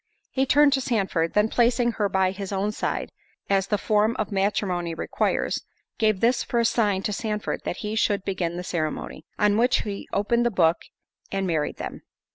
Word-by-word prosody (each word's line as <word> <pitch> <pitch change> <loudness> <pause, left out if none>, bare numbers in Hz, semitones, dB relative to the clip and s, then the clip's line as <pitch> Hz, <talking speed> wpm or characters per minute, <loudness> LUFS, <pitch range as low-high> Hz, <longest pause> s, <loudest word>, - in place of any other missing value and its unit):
He 265 0 +1
turned 290 +1 +5
to 270 - +2
Sandford—then 210 -3 +1
placing 240 0 +2
her 210 -3 -1
by 190 -1 +2
his 195 0 -6
own 200 +2 0
side, - - -3 0.4
as 195 0 +2
the 210 - +1
form 215 +2 +2
of 215 0 -2
matrimony 190 -4 0
requires, - - -1 0.4
gave 215 -4 +2
this 235 +1 +3
for 235 - -1
a 235 - +2
sign 205 -5 +1
to 210 - -1
Sandford 210 0 -3
that - - -3
he 210 - -2
should 205 -3 +1
begin 175 -3 -2
the 180 - -4
ceremony. 160 -4 -3
On 210 -1 +3
which, 245 +2 +3
he 200 -2 -5
opened 235 +4 +2
his 235 - -2
book, 165 -1 +4 0.5
and—married 180 -6 -1
them. - - -6
205 Hz, 180 wpm, -25 LUFS, 190-230 Hz, 0.5 s, turned